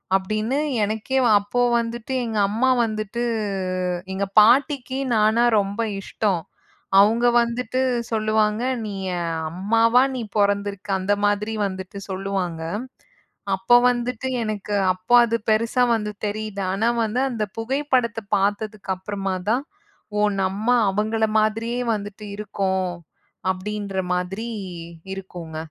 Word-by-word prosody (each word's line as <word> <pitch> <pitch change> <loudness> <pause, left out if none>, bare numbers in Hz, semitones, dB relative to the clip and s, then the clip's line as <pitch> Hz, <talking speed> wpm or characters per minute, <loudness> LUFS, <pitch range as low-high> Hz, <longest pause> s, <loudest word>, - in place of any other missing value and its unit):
அப்டின்னு 215 +7 0 0.3
எனக்கே 220 +5 -1 0.2
அப்போ 205 +5 -1 0.2
வந்துட்டு 235 +2 -4
எங்க 220 -2 -3
அம்மா 245 +5 +2 0.2
வந்துட்டு 215 +1 -3 0.9
"எங்க 200 +1 -1
பாட்டிக்கு 260 +3 +3 0.2
நானா 215 +2 +4 0.2
ரொம்ப 200 +3 -2 0.2
இஷ்டம்." 195 -4 -1 0.6
அவுங்க 230 +4 +5
வந்துட்டு 240 +2 -1 0.3
சொல்லுவாங்க, 215 0 +1 0.2
"நீ 205 - -5 0.2
என் 170 -1 -2 0.2
அம்மாவா 230 +6 +3
நீ 245 - -3 0.2
பொறந்திருக்க 200 0 0
அந்த 200 +2 +1
மாதிரி 210 +2 0
வந்துட்டு 190 +1 -7
சொல்லுவாங்க." 190 -4 -3 0.9
அப்போ 190 +6 +4
வந்துட்டு 245 +1 -2 0.2
எனக்கு 210 -1 -4 0.2
அப்போ 185 +6 -3
அது 230 0 0
பெருசா 230 +3 +2
வந்து 210 -1 -3
தெரியுது. 210 -1 -3
ஆனா 220 +4 +1 0.2
வந்து 225 +3 -1
அந்தப் 215 -5 -3
புகைப்படத்த 250 -2 0 0.2
பாத்ததுக்கு 205 0 -1
அப்புறமாதான், 195 +5 -2 0.5
ஓ! 210 - +2 0.2
நம்ம 195 +4 -2 0.2
அவுங்கள 220 +2 +1
மாதிரியே 225 +3 0
வந்துட்டு 205 0 -6
இருக்கோம் 190 -3 -1 0.6
அப்டின்ற 200 0 -4 0.2
மாதிரி 195 +6 -3 0.7
இருக்கூங்க. 175 -4 -8
215 Hz, 110 wpm, -23 LUFS, 195-230 Hz, 0.9 s, அவுங்க